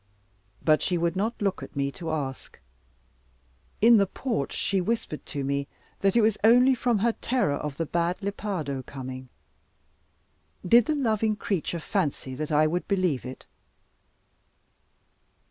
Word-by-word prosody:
But 155 -1 +4
she 180 - 0
would 170 +1 0
not 220 +5 -1
look 200 -2 -1
at - - -10
me 140 0 0
to 165 +2 -6
ask. 140 -4 -4 1.2
In 230 +1 +7
the 200 -1 +3
porch 210 - -3
she 195 -1 0
whispered 220 -6 -2
to 140 - -3
me, 140 +1 -1 0.3
that 195 +2 +2
it 235 - +5
was 215 -1 +2
only 245 +4 +6
from 245 -2 +1
her 230 +4 +2
terror 240 - 0
of 145 -1 -4
the 165 - -1
bad 170 +3 -1
Lepardo 195 -9 -3
coming. 130 -1 -8 1.4
Did 235 +4 +6
the 310 - +1
loving 220 -5 +1
creature 185 -4 -2
fancy 155 -8 -2
that 150 +4 -4
I 150 +1 +4
would 175 +3 -1
believe 185 -9 0
it? 130 - -9
180 Hz, 145 wpm, -26 LUFS, 145-220 Hz, 1.4 s, In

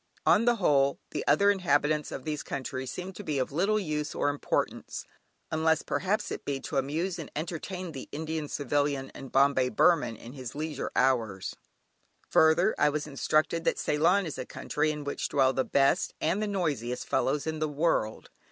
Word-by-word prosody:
On 225 - +5
the 240 0 +4
whole, 140 -9 +3
the - - -2
other 200 +8 +5
inhabitants 150 -5 +1
of 135 - -6
these 150 -2 -2
countries 130 -1 -4
seem 180 +8 -6
to 205 - -8
be 150 -6 -2
of 130 0 -1
little 195 +8 +2
use 150 -5 -3
or - - +1
importance, 145 0 -2 0.5
unless 160 0 +2
perhaps 210 +3 -1
it - - -5
be 140 -1 -2
to - - -4
amuse 160 +7 -1
and 160 - -6
entertain 175 +3 -4
the 135 -4 -8
Indian 155 0 -3
Civilian 145 -1 -1
and 135 - -8
the - - -13
"Bombay 135 -1 +3
Burman" 125 -1 +3
in 120 +3 -11
his 130 -3 -7
leisure 155 +1 -3
hours. 115 -7 +1 0.8
Further, 165 +6 +5
I 150 - +5
was 150 0 -2
instructed 155 +3 +1
that - - +2
Ceylon 175 +6 +2
is 160 - -5
a - - -3
country 150 +1 -1
in 150 -1 -3
which 145 - -3
dwell 135 -2 +3
the 130 - +1
best 135 +1 +2
(and 170 +6 0
the 215 - 0
noisiest!) 145 - -2
fellows 140 +2 +1
in 160 -1 -3
the 155 0 0
world. 145 -7 0
150 Hz, 185 wpm, -29 LUFS, 135-165 Hz, 0.8 s, On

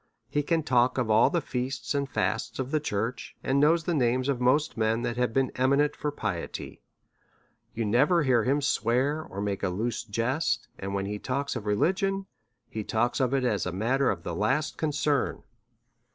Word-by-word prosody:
He 145 - +1
can 160 +2 0
talk 125 -2 +2
of 120 -4 +1
all 110 +2 +5
the 175 -2 0
feasts 130 +2 -3
and 140 -1 -1
fasts - - -1
of 130 0 -3
the 155 - +2
church, 115 -3 -3
and 135 +1 +2
knows 160 +3 +4
the 175 - -1
names 130 -1 +1
of 130 -3 0
most 145 +5 +2
men 110 +1 +1
that 120 - -1
have 125 -1 0
been 135 +2 +1
eminent 140 +3 +2
for 150 - -2
piety. 100 - -5 0.9
You 115 0 -1
never 145 - +3
hear 125 -5 +3
him 140 +4 +1
swear, 135 +3 +1
or 100 -7 -7
make 100 -1 -2
a - - 0
loose 110 +6 -2
jest; 125 +6 -1
and 100 0 -4
when 95 0 -1
he 105 +1 -4
talks 140 +4 -2
of 105 - -5
religion, 190 - +1 0.4
he 110 - -5
talks 120 +4 0
of 130 -2 +2
it 135 -1 +1
as 105 -7 0
of 90 - -4
a - - -5
matter 130 +6 +2
of 85 -4 -2
the 85 - -4
last 135 - 0
concern. 150 -3 0
125 Hz, 195 wpm, -27 LUFS, 110-145 Hz, 0.9 s, all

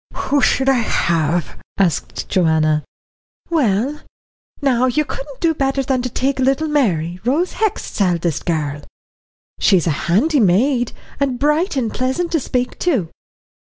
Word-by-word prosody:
"Who 285 +1 0
should 265 +1 +2
I 265 -2 +4
have?" 170 -6 0 0.2
asked 180 -7 -1
Joanna. 155 -3 +2 0.7
"Well, 270 - +1 0.6
now, 255 -3 +2
you 295 +5 +1
couldn't 275 -1 -8
do 330 -1 +3
better 270 -2 0
than 260 -1 0
take 260 +2 -1
little 270 +4 +1
Mary, 180 - 0
Rose 295 +10 +1
Hext's 430 - -2
eldest 170 -4 0
girl. 150 -3 -1 0.8
She's 185 -5 +3
a 165 - +2 0.2
handy 280 - +3
maid, 240 +5 +2 0.3
and 270 -3 0
bright 300 +6 +1
and 240 -5 -1
pleasant 265 +8 -1
to 325 - +2
speak 250 -1 -2
to." 255 - 0
255 Hz, 135 wpm, -19 LUFS, 175-285 Hz, 0.8 s, I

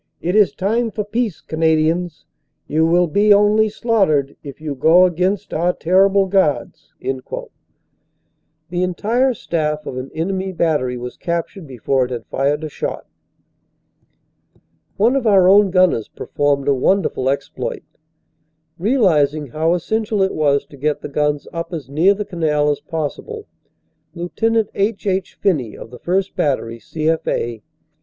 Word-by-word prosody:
"It 180 +3 -2
is 210 -2 +5
time 225 +5 0
for 210 -1 -3
peace, 220 -2 -2
Canadians; 160 0 0 0.4
you 160 +2 +1
will 175 +2 +3
be 205 +6 +2
only 210 +2 +4
slaughtered 195 - +1
if 140 -1 -10
you 155 -2 -4
go 160 +7 +5
against 185 +3 -1
our 175 +3 +1
terrible 195 +3 +3
Guards." 190 -6 -1
The 155 +5 -9
entire 225 +8 +1
staff 150 -5 -2
of 130 - -6
an 130 +1 -5
enemy 190 +3 -2
battery 145 -8 0
was 125 0 -7
captured 170 0 -4
before 130 +1 0
it - - -8
had 120 -2 -5
fired 145 +3 -1
a - - -2
shot. - - -5 1.9
One 230 +6 +3
of 260 -4 0
our 195 -3 +5
own 200 +1 +6
gunners 185 - +2
performed 145 -1 -1
a 140 - +4
wonderful 135 -2 +1
exploit. 135 -2 -3 1.0
Realizing 155 - +2
how 160 +6 +1
essential 215 +2 -1
it 190 - 0
was 145 -2 +1
to 140 - -15
get 150 +2 -1
the - - -6
guns 150 0 -1
up 165 0 -5
as 140 -5 -6
near 175 +8 +4
the 210 +1 -4
canal 150 -5 0
as 145 - -2
possible, 180 - -5 0.7
Lt. 175 +4 -7 0.3
H. 205 +1 -1
H. 190 -1 -1
Phinney 145 - 0
of 115 - -11
the 125 - -11
1st. 190 +2 -1
Battery, 115 -5 -1
C.F. 155 +7 -2
A. 115 -2 -2
165 Hz, 145 wpm, -19 LUFS, 145-195 Hz, 1.9 s, own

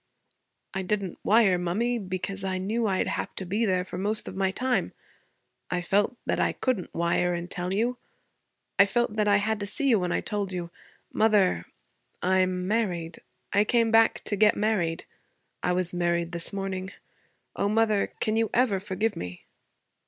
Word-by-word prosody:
'I 190 - -2
didn't 190 -1 -2
wire, 205 -4 +4
mummy, 225 +8 0
because 195 0 -3
I 190 -1 -1
knew 215 +5 -1
I'd 190 -2 +1
have - - -3
to 190 - -4
be 210 +5 0
there 185 -1 +1
for 180 - -6
most 210 +2 -1
of - - -6
my 190 0 +1
time. 250 +6 -1 0.8
I 180 -1 -1
felt 205 +7 +1
that - - 0
I - - +2
couldn't 250 -9 -2
wire 170 +1 +1
and 175 +1 -6
tell 180 -1 -2
you. 235 +5 0 0.8
I 200 - +8
felt 240 +1 0
that 210 -1 +1
I 205 -1 +5
had 215 +1 0
to 205 - -3
see 275 +7 0
you 225 -5 +5
when 180 -1 -1
I - - +1
told 205 -3 -3
you. 175 -2 -4 0.4
Mother 205 - +3 0.5
I'm 185 0 +1
married. 180 -7 -1 0.3
I 205 0 +5
came 230 0 +2
back 225 0 +4
to 205 - -1
get 210 +1 +4
married. 185 -6 0 0.6
I 180 - +1
was 180 -1 0
married 170 -1 0
this 170 -1 -2
morning. 195 -2 -3 0.7
O 200 - 0
mother, 215 -1 +2
can 215 - 0
you 225 -1 +1
ever 235 -6 +3
forgive 205 +2 -1
me?' 90 0 -7
195 Hz, 175 wpm, -27 LUFS, 180-220 Hz, 0.8 s, I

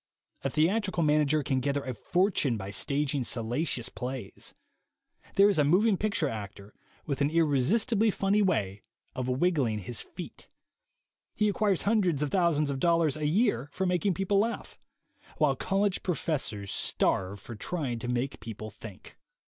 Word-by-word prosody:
A 135 - 0
theatrical 180 - +1
manager 150 0 +3
can 130 -1 0
gather 140 +2 -1
a 130 - -4
fortune 170 - +1
by 95 -1 -6
stag 140 +6 -1
ing 140 -3 0
salacious 120 +3 -2
plays. 125 -5 -7 0.8
There 200 +1 +7
is 200 -6 +2
a - - +5
moving 195 +9 +4
picture 210 +2 0
actor 100 -1 -7 0.3
with 140 -2 -2
an 140 - +3
irresistibly 170 - +2
funny 200 +1 +1
way 105 - 0 0.3
of 130 -1 -3
wiggling 130 -5 +1
his 110 +4 -5
feet. - - -10 0.9
He 210 - +2
acquires 205 -2 +1
hundreds 185 -9 +2
of 150 - -2
thousands 165 -6 +2
of 135 - -3
dollars 165 -2 +2
a 150 -1 -1
year 155 - +1
for 190 +5 -2
making 180 +1 +1
people 195 +1 +1
laugh; 230 +3 -2 0.6
while 150 -3 +3
college 195 +6 0
pro 180 - -1
fessors 110 -12 -2
starve 95 +2 0
for 115 - -9
trying 130 -1 -3
to 120 - -5
make 125 +2 -2
people 110 -1 -7
think. 100 -2 -12
150 Hz, 155 wpm, -29 LUFS, 125-185 Hz, 0.9 s, There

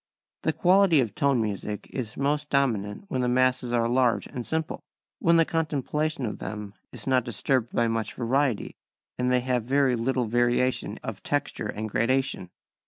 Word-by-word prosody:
#This - - 0
quality 185 -3 +5
of 115 -6 0
tone 140 -1 +2
music 105 -1 -3
is 120 -5 -5
most 145 +2 0
dominant 110 - 0
when 130 - -1
the 125 - +1
masses 125 0 +2
are 115 -1 +2
large 125 0 +2
and 125 - -6
simple#, 160 +4 -3 0.4
when 170 0 +4
the 165 - +5
contemplation 155 -2 -1
of 105 - -4
them 105 -2 -6 0.2
is - - -8
not 130 -2 +3
disturbed 120 +1 0
by 120 - +2
much 115 -1 -2
variety, 130 -1 0 0.4
and 125 0 +1
they 125 0 +3
have 125 -2 -1
little 130 -2 +2
variation 120 +2 +1
of - - -6
texture - - -2
and 110 +1 -4
gradation. 115 -3 0
125 Hz, 165 wpm, -26 LUFS, 115-140 Hz, 0.4 s, quality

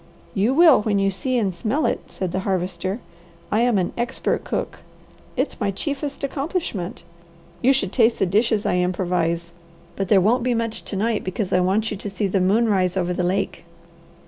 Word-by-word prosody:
"You 215 +7 +2
will 325 -7 +7
when 210 -1 +1
you 195 0 +2
see 255 +7 -1
and 200 -5 0
smell 235 - -1
it," - - +1
said 185 -2 -4
the 185 - -1
Harvester. 190 0 -2 0.5
"I 215 - +3
am 240 -3 +3
an 180 -2 0
expert 240 +2 -1
cook. - - -3 0.6
It's - - -1
my 205 - +1
chiefest 280 +9 -4
accomplishment. 275 - -3 0.6
You 260 - +5
should 255 -9 0
taste 230 -2 +4
the - - +2
dishes 215 +3 +1
I 180 - +2
improvise. 175 -2 0 0.4
But 195 - -2
there 195 +1 +5
won't 225 +7 +3
be 245 0 +1
much 230 -1 -2
to - - -5
night, 215 +2 0
because 185 +1 -3
I 180 - +4
want 195 +5 +1
you 210 - -3
to 205 - -5
see 200 +1 -2
the 195 0 +1
moon 210 +6 +3
rise 185 -3 +1
over 180 -1 0
the 180 - -1
lake." 180 +3 -1
200 Hz, 195 wpm, -22 LUFS, 185-235 Hz, 0.6 s, will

